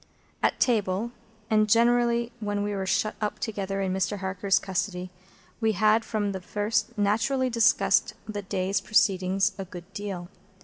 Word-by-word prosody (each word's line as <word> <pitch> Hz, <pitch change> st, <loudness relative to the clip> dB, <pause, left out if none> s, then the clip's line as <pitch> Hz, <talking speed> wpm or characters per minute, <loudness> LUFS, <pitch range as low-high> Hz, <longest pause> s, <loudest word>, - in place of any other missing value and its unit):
At -, -, +1 dB
table, 215 Hz, -1 st, +1 dB, 0.4 s
and 215 Hz, -1 st, +3 dB
generally 235 Hz, +1 st, +3 dB
when 205 Hz, -1 st, -2 dB
we 205 Hz, 0 st, -2 dB
were 190 Hz, -1 st, -3 dB
shut 210 Hz, +2 st, +1 dB
up 210 Hz, -1 st, -2 dB
together 195 Hz, -3 st, -3 dB
in 190 Hz, -1 st, -1 dB
Mr. 190 Hz, +2 st, -1 dB
Harker's 195 Hz, 0 st, +1 dB
custody, 185 Hz, -1 st, -3 dB, 0.5 s
we 220 Hz, -1 st, +2 dB
had 215 Hz, +3 st, +3 dB
from 210 Hz, -3 st, -1 dB
the 190 Hz, -1 st, -5 dB
first 210 Hz, +3 st, -1 dB
naturally 225 Hz, +6 st, +1 dB
discussed 210 Hz, -3 st, +3 dB
the 205 Hz, -1 st, -4 dB
day's 190 Hz, 0 st, -1 dB
proceedings 195 Hz, -2 st, +2 dB
a 195 Hz, -, -3 dB
good 180 Hz, +1 st, -11 dB
deal. 195 Hz, -4 st, -5 dB
205 Hz, 150 wpm, -27 LUFS, 190-220 Hz, 0.5 s, and